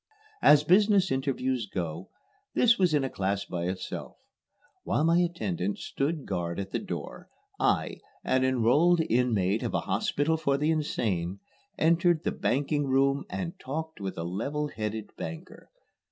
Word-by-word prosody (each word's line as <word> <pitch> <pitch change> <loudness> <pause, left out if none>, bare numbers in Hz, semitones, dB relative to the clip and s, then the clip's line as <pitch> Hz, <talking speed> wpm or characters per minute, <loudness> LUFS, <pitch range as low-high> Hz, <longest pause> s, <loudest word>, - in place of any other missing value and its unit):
As 150 0 +7
business 195 +2 +4
interviews 130 -3 -1
go, 85 -2 -4 0.5
this 235 -2 +4
was 180 -5 +3
in 145 - +2
a 135 - -1
class 100 +1 -1
by 85 -1 -4
itself. 90 +1 -5 0.7
While 150 - 0
my 165 +2 +4
attendant 105 - -1
stood 145 +2 -2
guard 85 -2 -3
at 95 0 -5
the - - -1
door, - - -7 0.3
I, - - +1 0.2
an 130 0 +2
enrolled 130 +8 +3
inmate 110 -4 +2
of - - -2
a - - +1
hospital 160 +3 0
for 140 -3 +1
the 150 +3 +1
insane, 100 - -1 0.4
entered 170 0 +3
the - - 0
banking 145 +2 0
room 135 +1 +2
and 175 -2 -5
talked 160 -1 -5
with 95 -1 -4
a 85 - -3
level 140 - -2
headed 110 -2 -4
banker. 170 +2 -8
135 Hz, 150 wpm, -28 LUFS, 100-160 Hz, 0.7 s, As